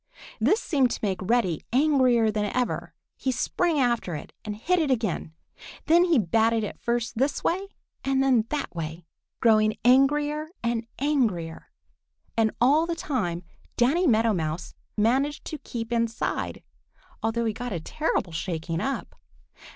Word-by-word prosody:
This 435 - +3
seemed 275 - +2
to - - -3
make 190 -3 -1
Reddy 190 -5 +1
angrier 255 -5 +4
than 210 0 -1
ever. 250 -1 -2 0.2
He 265 - -1
sprang 315 +6 0
after 235 - +1
it 150 - -8
and 210 -1 -4
hit 355 +12 +1
it 310 -4 +1
again. 220 -10 -1 0.5
Then 340 +2 +5
he 340 -4 +3
batted 225 +2 +2
it 210 - -5
first 235 -1 -2
this 275 +2 0
way 380 +4 0 0.4
and 270 0 +2
then 250 -5 +3
that 295 -1 -3
way, 160 +1 -5 0.4
growing 215 -2 +4
angrier 295 +4 +3 0.2
and 235 -1 -1
angrier. 225 - -1 0.7
And 225 -1 +3
all 295 +7 +4
the 340 - -1
time 200 - -2 0.3
Danny 310 +9 +3
Meadow 225 -2 +3
Mouse 160 -1 -3 0.2
managed 265 +7 +1
to 310 - -5
keep 230 0 -5
inside, 230 -1 -1 0.6
although 230 +1 0
he 220 - 0
got 245 +2 -5
a 175 - -2
terrible 185 - -2
shaking 165 0 -3
up. 265 -9 -3
235 Hz, 150 wpm, -26 LUFS, 210-275 Hz, 0.7 s, Then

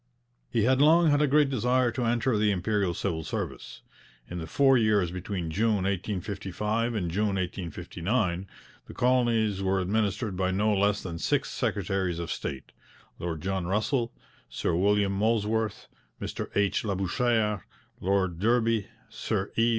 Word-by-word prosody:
He 115 -3 +1
had 130 +3 +3
long 160 +2 +6
had 145 0 +3
a 150 - +4
great 145 0 +3
desire 125 0 +2
to 120 +2 -2
enter 120 +1 +1
the 105 0 +2
Imperial 100 -1 0
civil 80 -1 -2
service. - - -5 0.4
In 90 - -5
the 80 - -6
four 135 +4 +4
years 105 -7 +3
between 90 -2 -4
June 110 +6 +2
1855 105 +4 -2
and 90 -6 -1
June 100 +2 0
1859 95 +2 -2 0.4
the - - -10
colonies 115 -5 +2
were 95 0 +1
administered 105 +2 0
by 95 0 0
no 105 +3 +2
less 100 +1 +1
than 85 -3 -5
six - - 0
secretaries 95 -3 -1
of 85 -2 -4
state: 65 -2 -5 0.5
Lord 80 -3 -4
John 95 0 -2
Russell, 115 +5 0 0.4
Sir - - -1
William 100 +3 +2
Molesworth, 110 +1 0 0.3
Mr - - -5
H. 100 -1 +2
Labouchere, 105 +1 0 0.4
Lord 95 -2 0
Derby, 115 0 +2 0.2
Sir 95 +1 -3
E. 115 +1 +3
105 Hz, 145 wpm, -28 LUFS, 95-115 Hz, 0.5 s, long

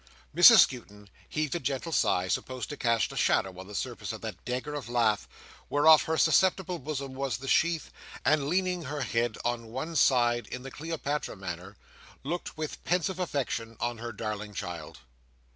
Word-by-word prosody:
Mrs 200 +7 +10
Skewton 105 -5 -2 0.2
heaved 155 -3 -1
a 175 - -1
gentle 135 +4 -3
sigh, 95 - +2
supposed 130 +6 -3
to 145 - -5
cast 115 -4 +1
a - - -9
shadow 95 -1 +1
on 95 - -9
the 105 - -9
surface - - -4
of - - -7
that - - -7
dagger 130 +4 -3
of 145 -5 -5
lath, 115 -4 +1 0.4
whereof 155 +2 +6
her 160 0 0
susceptible 180 +2 +3
bosom 140 -1 -5
was 135 0 -2
the 135 - -9
sheath: 165 +3 +2 0.3
and 145 0 +3
leaning 180 -1 0
her 145 +2 -4
head 115 -3 0
on 120 -1 -1
one 135 +9 -5
side, 120 -4 +3
in 125 - -7
the 135 - -8
Cleopatra 150 -3 -3
manner, 95 0 -7 0.5
looked 165 +3 -4
with 155 -1 -5
pensive 180 +1 0
affection 125 -9 -3
on 120 -1 -2
her 120 +1 -5
darling 105 -1 -5
child. 85 -5 -6
130 Hz, 175 wpm, -29 LUFS, 115-155 Hz, 0.5 s, Mrs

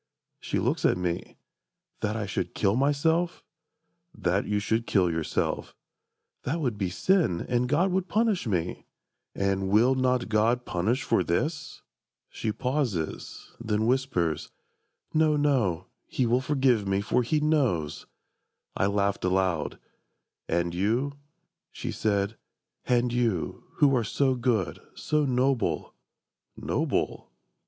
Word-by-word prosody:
She - - -2
looks - - 0
at - - +3
me. 90 -1 -3 0.6
"That 105 +1 -1
I 110 -2 -2
should 100 - -3
kill 100 0 +2
myself?"— 160 +6 +1 0.7
"That 95 +3 0
you 105 - +1
should 110 +3 0
kill 90 -4 +3
yourself."—"That 85 - -4
would 125 -8 -1
be 95 -3 -1
sin, 155 - +1
And 125 0 +1
God 170 +7 +2
would 190 0 0
punish 215 - +1
me!"—"And 95 +1 -3
will 115 +6 +5
not 130 -1 +1
God 115 +3 +2
Punish 110 +10 0
for - - +2
this?" 150 - -2 0.5
She 110 - -3
pauses: 125 - -3
then 110 -1 0
whispers: 115 - 0 0.6
"No, 155 -1 +3
no, 120 - +1 0.2
He 130 - 0
will 120 +2 +2
forgive 130 -6 +2
me, 95 0 +1
for 115 +4 +1
He 150 +6 +1
knows!" 130 - 0 0.7
I 95 - +2
laughed 100 0 0
aloud: 90 -3 0 0.7
"And 85 +1 0
you," 115 +10 0 0.6
she - - -5
said, 100 0 0 0.5
"and 120 -1 +2
you, 115 -8 -1
Who 140 -2 +4
are 120 - +2
so 130 +5 +1
good, 120 -6 0 0.2
so 150 -1 0
noble"... 130 -2 0 0.6
"Noble? - - -1
115 Hz, 125 wpm, -27 LUFS, 95-135 Hz, 0.7 s, will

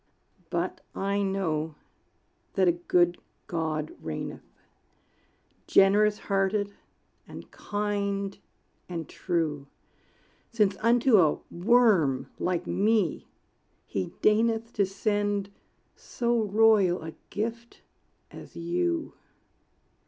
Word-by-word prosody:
But - - -2
I 200 +1 0
know 165 -6 -1 0.8
that 190 -1 +3
a - - +6
good 175 0 +1 0.3
God 155 -2 -3
reigneth, 80 -1 -6 1.2
Generous 210 +2 +4
hearted 200 0 0 0.5
and - - -11
kind 200 -1 -2 0.5
and 165 -3 -5
true; 155 -5 -2 0.8
Since 210 -4 +2
unto 235 0 +4
a 155 -4 +3
worm 175 - +3
like 180 -1 -1
me 210 -4 +1 0.6
he 95 -2 -3
deigneth 225 +2 +2
To 200 -3 +1
send 205 0 -1 0.4
so 235 -2 -1
royal 205 -4 +4
a 160 0 -7 0.2
gift 230 +3 -5 0.5
as - - -12
you. 85 0 -1
195 Hz, 90 wpm, -27 LUFS, 165-210 Hz, 1.2 s, a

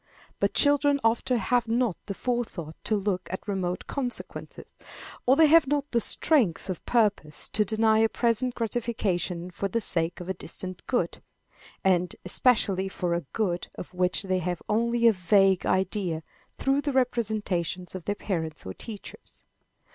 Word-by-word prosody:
But - - 0
children 285 0 +4
often 235 +2 +2
have 235 +3 +1
not 230 -4 +1
the 200 - -4
forethought 215 -11 -3
to 220 - +2
look 195 -2 -1
at 190 - -6
remote 185 -3 -2
consequences, 255 -4 -6 0.5
or 260 - +6
they 320 +2 +6
have 315 -1 +6
not 290 0 -1
the 235 - +2
strength 220 - +1
of 180 - -6
purpose 210 -10 +1
to 210 - +2
deny 220 0 +3
a 225 0 +4
present 240 +2 0
gratification 200 -7 -2
for 200 - -2
the 230 +4 -1
sake 170 -4 -1
of 180 - -7
a 190 - -1
distant 185 0 -2
good, 250 - -1 0.6
and 180 -2 +2
especially 195 -2 +2
for 180 -2 -2
a 170 -5 -2
good 180 -6 -1
of 180 - -8
which 180 +2 +1
they 185 -1 0
have 175 0 -3
only 235 +2 +1
a 230 - +6
vague 190 0 +3
idea 185 -4 0 0.3
through 275 +1 +1
the 290 -1 -2
representations 210 -8 -1
of 185 -3 -7
their 205 - -1
parents 160 -7 -4
or 95 - -5
teachers. 215 - -10
205 Hz, 160 wpm, -27 LUFS, 180-240 Hz, 0.6 s, or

